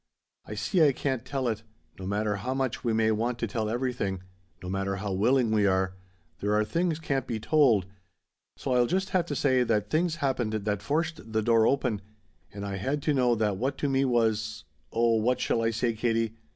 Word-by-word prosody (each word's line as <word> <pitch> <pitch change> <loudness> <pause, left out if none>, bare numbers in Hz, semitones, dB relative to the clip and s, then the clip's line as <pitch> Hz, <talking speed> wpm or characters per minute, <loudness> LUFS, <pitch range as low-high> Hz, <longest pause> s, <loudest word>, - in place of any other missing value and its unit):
I 105 - -6
see 170 - +2
I 145 -3 +5
can't 130 -3 -2
tell 130 -1 -2
it; 110 -2 -1 0.4
no 95 - -5
matter 105 +1 0
how 125 +7 -3
much 130 -3 -2
we 120 - +1
may 110 0 +2
want 115 +3 0
to 115 - -1
tell 110 0 -2
everything 115 -6 -2 0.4
no - - -6
matter 95 +1 -1
how 100 0 -3
willing 115 +4 +2
we 105 -2 +3
are 95 -1 +1 0.5
there 105 +1 0
are 105 0 +2
things 165 +8 0
can't 135 -5 -2
be 115 - -2
told, 120 - +3 0.7
so 130 - -2
I'll 125 -1 +4
just 190 +5 -1
have 175 -2 +1
to 145 - -3
say 130 -2 +3
that 105 -4 0
things 165 +1 +1
happened 130 -7 -1
that 105 -1 -1
forced 155 -5 -2
the 110 0 +1
door 115 0 +4
open, 125 -7 0 0.5
and 100 0 -6
I 100 -1 -3
had 135 +8 -2
to 150 - +2
know 125 -3 +3
that 105 -3 0
what 135 +5 -1
to 145 - -1
me 135 0 +2
was 110 - 0 0.3
oh 115 0 +3
what 125 +3 +1
shall 115 - +1
I 115 - +2
say, 115 +1 0
Katie? 115 0 0
115 Hz, 210 wpm, -28 LUFS, 105-135 Hz, 0.7 s, I